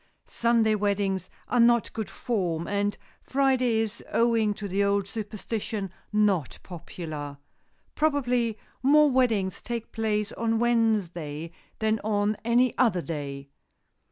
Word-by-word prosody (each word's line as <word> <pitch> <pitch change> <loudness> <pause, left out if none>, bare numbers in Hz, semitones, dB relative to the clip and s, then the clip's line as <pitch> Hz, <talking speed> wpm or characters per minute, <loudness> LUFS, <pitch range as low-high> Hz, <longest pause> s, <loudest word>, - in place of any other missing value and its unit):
Sunday 230 -2 +2
weddings 200 -3 0 0.2
are 245 - +1
not 235 -1 +4
good 220 -2 -4
form, 180 -9 -2
and 205 0 0 0.2
Friday 255 -4 +2
is, 225 0 -4
owing 230 -2 +3
to 205 -1 -5
the 195 +1 +1
old 200 -1 +1
superstition, 215 -1 -4 0.2
not 205 -8 +1
popular. 155 -4 -7 0.6
Probably 250 -7 +1 0.2
more 295 +2 +5
weddings 225 -8 +1
take 235 -2 -5
place 215 -2 -1
on 225 -1 0
Wednesday 185 -10 0 0.3
than 220 0 +1
on 210 0 0
any 240 +2 +3
other 195 -9 +3
day. 140 -3 -5
215 Hz, 120 wpm, -27 LUFS, 190-235 Hz, 0.6 s, more